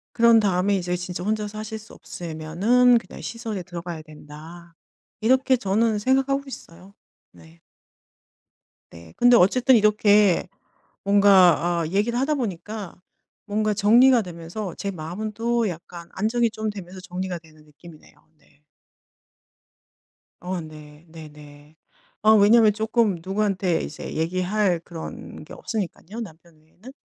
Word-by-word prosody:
그런 230 Hz, -1 st, +6 dB
다음에 200 Hz, 0 st, +1 dB
'이제 180 Hz, -1 st, -2 dB
진짜 180 Hz, 0 st, -6 dB
혼자 215 Hz, 0 st, -1 dB
사실 215 Hz, +1 st, -7 dB
수 220 Hz, -, -16 dB
없으면은 180 Hz, +10 st, +1 dB
그냥 230 Hz, -, -8 dB
시설에 225 Hz, -5 st, -5 dB
들어가야 170 Hz, -2 st, -7 dB
된다.' 155 Hz, +2 st, -13 dB, 0.5 s
이렇게 260 Hz, +3 st, +3 dB
저는 215 Hz, 0 st, 0 dB
생각하고 270 Hz, +4 st, +1 dB
있어요. 185 Hz, -6 st, -12 dB, 0.4 s
네. 85 Hz, -1 st, -19 dB, 1.3 s
네. 85 Hz, -1 st, -14 dB
근데 245 Hz, 0 st, +5 dB
어쨌든 250 Hz, +8 st, +4 dB
이렇게 210 Hz, -3 st, +3 dB, 0.5 s
뭔가 190 Hz, -4 st, +4 dB
아 160 Hz, -, -2 dB
얘기를 210 Hz, +6 st, 0 dB
하다 280 Hz, +4 st, 0 dB
보니까 210 Hz, -, -5 dB, 0.5 s
뭔가 215 Hz, 0 st, -1 dB
정리가 235 Hz, +5 st, +5 dB
되면서 175 Hz, +2 st, -7 dB
제 200 Hz, -, -4 dB
마음은 185 Hz, +6 st, -6 dB
또 235 Hz, 0 st, 0 dB
약간 170 Hz, -1 st, -8 dB
안정이 230 Hz, +4 st, 0 dB
좀 220 Hz, -1 st, -4 dB
되면서 190 Hz, -2 st, -9 dB
정리가 180 Hz, 0 st, -5 dB
되는 155 Hz, -2 st, -21 dB
느낌이네요. 155 Hz, +1 st, -17 dB, 0.2 s
네. 145 Hz, 0 st, -30 dB, 1.8 s
어 180 Hz, 0 st, -3 dB
네. 155 Hz, 0 st, -12 dB
네네. 150 Hz, -2 st, -14 dB, 0.5 s
아 215 Hz, -, +6 dB
왜냐하면 215 Hz, +1 st, +5 dB
조금 220 Hz, -3 st, 0 dB
누구한테 190 Hz, -3 st, -1 dB
이제 -, -, -7 dB
얘기할 185 Hz, +3 st, 0 dB
그런 165 Hz, -2 st, -9 dB
게 155 Hz, -, -13 dB
없으니깐요 215 Hz, +1 st, -6 dB
남편 165 Hz, -4 st, -12 dB
외에는. 180 Hz, +10 st, -16 dB
195 Hz, 285 characters per minute, -23 LUFS, 170-220 Hz, 1.8 s, 그런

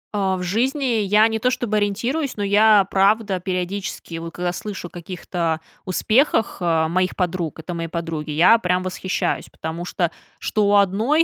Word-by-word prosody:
А, 190 Hz, -2 st, +1 dB
в 180 Hz, -, -4 dB
жизни 250 Hz, +10 st, 0 dB, 0.2 s
я 210 Hz, +2 st, +4 dB
не 225 Hz, 0 st, -2 dB
то 250 Hz, -, +2 dB
чтобы 240 Hz, -4 st, -1 dB
ориентируюсь, 235 Hz, +8 st, -1 dB
но 205 Hz, -, -2 dB
я 205 Hz, 0 st, +5 dB
правда 200 Hz, 0 st, +2 dB
периодически, 180 Hz, -2 st, -4 dB
вот 165 Hz, 0 st, -6 dB
когда 175 Hz, 0 st, -2 dB
слышу 200 Hz, -2 st, -6 dB
о -, -, -18 dB
каких-то 170 Hz, -2 st, -3 dB, 0.3 s
успехах, 220 Hz, -, +2 dB
а, 165 Hz, -2 st, +2 dB
моих 185 Hz, +2 st, 0 dB
подруг. 175 Hz, -3 st, -2 dB
Это 175 Hz, +3 st, -6 dB
мои 165 Hz, -1 st, -3 dB
подруги, 165 Hz, -2 st, -4 dB
я 170 Hz, +10 st, +5 dB
прям 180 Hz, -2 st, 0 dB
восхищаюсь. 185 Hz, 0 st, -2 dB
Потому 165 Hz, +2 st, -5 dB
что, 175 Hz, -1 st, -1 dB, 0.3 s
что 210 Hz, -1 st, 0 dB
у 205 Hz, -, +4 dB
одной, 215 Hz, -, +3 dB
190 Hz, 170 wpm, -21 LUFS, 175-215 Hz, 0.3 s, я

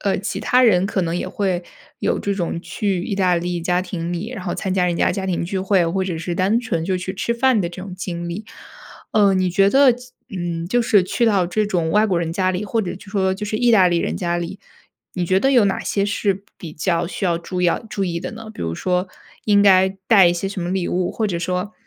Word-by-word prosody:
呃， 195 Hz, -, 0 dB
其 200 Hz, -, -4 dB
他 250 Hz, +1 st, +3 dB
人 190 Hz, -5 st, +4 dB
可 195 Hz, -2 st, -1 dB
能 165 Hz, -1 st, -2 dB
也 175 Hz, -, -3 dB
会 185 Hz, -3 st, -1 dB, 0.4 s
有 -, -, 0 dB
这 200 Hz, 0 st, -1 dB
种 170 Hz, -3 st, -2 dB
去 195 Hz, -4 st, -2 dB
意 -, -, -2 dB
大 185 Hz, -3 st, +2 dB
利 175 Hz, 0 st, -2 dB
家 180 Hz, +2 st, 0 dB
庭 175 Hz, -2 st, -5 dB
里， 185 Hz, +7 st, -4 dB
然 195 Hz, -, -7 dB
后 180 Hz, -, -3 dB
参 190 Hz, -, -3 dB
加 180 Hz, -2 st, +2 dB
人 170 Hz, -1 st, 0 dB
家 -, -, +2 dB
家 195 Hz, -2 st, -3 dB
庭 180 Hz, -2 st, -1 dB
聚 190 Hz, +2 st, -3 dB
会， 190 Hz, -2 st, +2 dB
或 190 Hz, +3 st, -1 dB
者 185 Hz, -3 st, -3 dB
是 170 Hz, +2 st, -4 dB
单 195 Hz, +6 st, +2 dB
纯 180 Hz, -9 st, -2 dB
就 185 Hz, 0 st, 0 dB
去 185 Hz, +1 st, -4 dB
吃 235 Hz, +4 st, -1 dB
饭 250 Hz, -2 st, +3 dB
的 170 Hz, -, -1 dB
这 180 Hz, +2 st, -9 dB
种 190 Hz, -2 st, -7 dB
经 175 Hz, -2 st, -5 dB
历， 205 Hz, +6 st, -6 dB, 0.7 s
呃， 200 Hz, -3 st, +4 dB
你 185 Hz, -1 st, +1 dB
觉 195 Hz, +3 st, +4 dB
得 270 Hz, +3 st, +6 dB
即 245 Hz, +1 st, -11 dB, 0.2 s
嗯， 170 Hz, -2 st, -3 dB
就 245 Hz, +7 st, +1 dB
是 210 Hz, -4 st, +4 dB
去 235 Hz, +6 st, 0 dB
到 195 Hz, -5 st, +3 dB
这 215 Hz, +5 st, 0 dB
种 175 Hz, -5 st, 0 dB
外 210 Hz, +1 st, +4 dB
国 185 Hz, -5 st, +1 dB
人 165 Hz, -1 st, -2 dB
家 185 Hz, +1 st, +1 dB
里， 185 Hz, +3 st, -3 dB
或 225 Hz, +3 st, 0 dB
者 180 Hz, -, -4 dB
就 195 Hz, -, -15 dB
说 190 Hz, -2 st, +1 dB
就 210 Hz, -, -5 dB
是 215 Hz, -, -2 dB
意 245 Hz, -1 st, +3 dB
大 195 Hz, -5 st, +6 dB
利 175 Hz, -1 st, +2 dB
人 -, -, -2 dB
家 175 Hz, -1 st, -1 dB
里， 175 Hz, +3 st, -5 dB, 0.5 s
你 180 Hz, -2 st, -2 dB
觉 185 Hz, +2 st, +3 dB
得 270 Hz, +7 st, +2 dB
有 245 Hz, -5 st, +5 dB
哪 195 Hz, -, 0 dB
些 200 Hz, -, -1 dB
是 200 Hz, -1 st, -1 dB, 0.2 s
比 160 Hz, -3 st, -8 dB
较 170 Hz, +2 st, 0 dB
需 195 Hz, +3 st, -5 dB
要 170 Hz, -2 st, +2 dB
注 180 Hz, +1 st, -4 dB
要 175 Hz, -, +2 dB
注 210 Hz, -3 st, -2 dB
意 170 Hz, -2 st, -2 dB
的 180 Hz, -, -6 dB
呢？ 220 Hz, 0 st, -9 dB
比 -, -, -11 dB
如 80 Hz, 0 st, -2 dB
说 180 Hz, -, -1 dB, 0.4 s
应 205 Hz, -1 st, +4 dB
该 190 Hz, -1 st, +6 dB, 0.2 s
带 200 Hz, -5 st, +7 dB
一 175 Hz, -, +4 dB
些 195 Hz, +3 st, -3 dB
什 195 Hz, -2 st, -5 dB
么 175 Hz, -, -3 dB
礼 185 Hz, -2 st, -1 dB
物， 180 Hz, 0 st, -1 dB
或 220 Hz, -, -1 dB
者 175 Hz, -3 st, -2 dB
说， 180 Hz, +4 st, -2 dB
185 Hz, 285 characters per minute, -20 LUFS, 175-205 Hz, 0.7 s, 带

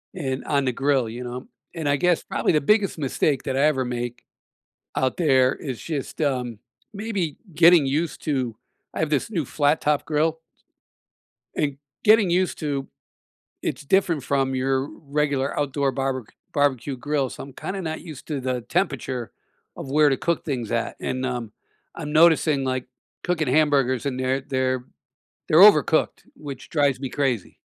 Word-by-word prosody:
in 135 Hz, -6 st, -3 dB
on 140 Hz, -2 st, +1 dB
the 130 Hz, -, +2 dB
grill, 135 Hz, -2 st, +1 dB
you 120 Hz, +3 st, -6 dB
know, 125 Hz, +1 st, -6 dB, 0.3 s
and 160 Hz, -3 st, -3 dB
I 145 Hz, -, +4 dB
guess 175 Hz, +3 st, +2 dB
probably -, -, 0 dB
the 150 Hz, -, +3 dB
biggest 205 Hz, +4 st, +2 dB
mistake 140 Hz, -1 st, 0 dB
that 130 Hz, -, -2 dB
I -, -, +3 dB
ever 140 Hz, -4 st, +2 dB
make 120 Hz, 0 st, -4 dB, 0.7 s
out 130 Hz, -1 st, +1 dB
there 130 Hz, -6 st, +4 dB
is 130 Hz, -5 st, -6 dB
just, 150 Hz, -3 st, -5 dB
um, 125 Hz, -6 st, -1 dB, 0.4 s
maybe 200 Hz, -8 st, -2 dB, 0.2 s
getting 170 Hz, -1 st, +7 dB
used 155 Hz, +4 st, -1 dB
to 130 Hz, -7 st, -1 dB, 0.4 s
I -, -, -4 dB
have 155 Hz, -1 st, 0 dB
this 145 Hz, +7 st, 0 dB
new 170 Hz, -8 st, -1 dB
flat-top 145 Hz, +1 st, +1 dB
grill 160 Hz, +2 st, 0 dB, 1.1 s
and 145 Hz, -2 st, -1 dB, 0.3 s
getting 215 Hz, -3 st, +5 dB
used 180 Hz, +1 st, +1 dB
to 140 Hz, -3 st, -2 dB, 0.7 s
it's -, -, -3 dB
different 165 Hz, 0 st, +2 dB
from 135 Hz, 0 st, 0 dB
your 135 Hz, +1 st, 0 dB
regular 145 Hz, -2 st, -1 dB
outdoor 140 Hz, -1 st, 0 dB
barber 135 Hz, -2 st, -2 dB, 0.3 s
barbecue 140 Hz, -2 st, +1 dB
grill, 140 Hz, +1 st, -1 dB
so, -, -, -8 dB
I'm 135 Hz, -, -10 dB
kinda 190 Hz, +8 st, -5 dB
not 160 Hz, -2 st, -4 dB
used 155 Hz, -5 st, -10 dB
to 145 Hz, -3 st, -2 dB
the 130 Hz, -1 st, -2 dB
temperature 130 Hz, -, -2 dB, 0.4 s
of 135 Hz, -, -7 dB
where 150 Hz, +1 st, +5 dB
to 135 Hz, -, +2 dB
cook 170 Hz, +4 st, -1 dB
things 125 Hz, -7 st, -3 dB
at, 115 Hz, -1 st, -1 dB
and, 130 Hz, 0 st, -2 dB
um, 120 Hz, -4 st, -4 dB, 0.4 s
I'm 150 Hz, -3 st, -6 dB
noticing 155 Hz, -3 st, +4 dB
like 130 Hz, -1 st, -2 dB, 0.4 s
cooking 165 Hz, -5 st, 0 dB
hamburgers 135 Hz, -3 st, +2 dB
and 130 Hz, -2 st, -2 dB
they're 130 Hz, +1 st, 0 dB
they're 130 Hz, -2 st, -1 dB, 0.6 s
they're 155 Hz, -, +5 dB
overcooked 170 Hz, -6 st, +5 dB
which 140 Hz, -3 st, -9 dB
drives 145 Hz, -5 st, +2 dB
me 135 Hz, -1 st, -4 dB
crazy. 125 Hz, -7 st, -2 dB
140 Hz, 160 wpm, -24 LUFS, 130-155 Hz, 1.1 s, getting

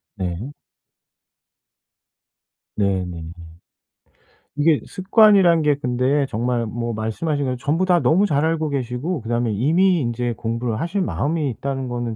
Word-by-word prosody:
네. 95 Hz, +6 st, -4 dB, 2.3 s
네네. 90 Hz, -5 st, -2 dB, 1.3 s
이게 150 Hz, 0 st, +3 dB
습관이란 190 Hz, -4 st, +4 dB
게 150 Hz, -1 st, +2 dB
근데 135 Hz, +1 st, 0 dB
정말 120 Hz, +1 st, -1 dB
뭐 115 Hz, +1 st, -4 dB
말씀하신 140 Hz, +7 st, -2 dB
거 130 Hz, -1 st, -1 dB
전부 155 Hz, +8 st, 0 dB
다 175 Hz, -2 st, +3 dB
너무 185 Hz, +7 st, +3 dB
잘 150 Hz, -5 st, +1 dB
알고 160 Hz, -1 st, 0 dB
계시고 135 Hz, +4 st, -3 dB
그다음에 115 Hz, 0 st, -1 dB
이미 165 Hz, -, +2 dB
인제 120 Hz, -1 st, -2 dB
공부를 115 Hz, 0 st, -3 dB
하실 175 Hz, +4 st, -2 dB
마음이 155 Hz, -4 st, -1 dB
있다는 135 Hz, +2 st, -4 dB
거는 120 Hz, -2 st, -3 dB
130 Hz, 255 characters per minute, -21 LUFS, 115-160 Hz, 2.3 s, 습관이란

